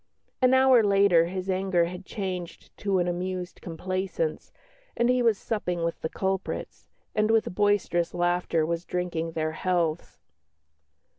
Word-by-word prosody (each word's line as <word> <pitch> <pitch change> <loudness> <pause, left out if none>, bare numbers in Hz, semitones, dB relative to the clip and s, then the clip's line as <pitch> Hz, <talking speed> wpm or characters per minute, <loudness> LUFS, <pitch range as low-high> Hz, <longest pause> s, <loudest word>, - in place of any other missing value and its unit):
An 255 0 +5
hour 260 -2 +6
later 200 -5 +4
his 185 +1 -4
anger 185 -2 +1
had 180 +2 -8
changed 185 -4 -6
to 200 -2 0
an 175 -1 +1
amused 180 0 -4
complaisance, 180 -1 -3 0.5
and 240 +1 +2
he 250 0 +3
was 230 -4 +3
supping 180 -7 -2
with 165 -1 -2
the 160 - -2
culprits, 190 +1 -3 0.3
and 215 0 +1
with 225 -4 +2
boisterous 205 -4 +1
laughter 175 -2 +1
was 170 +1 -2
drinking 175 -2 -3
their 155 -1 -1
healths. 170 -1 -1
180 Hz, 140 wpm, -27 LUFS, 170-200 Hz, 0.5 s, hour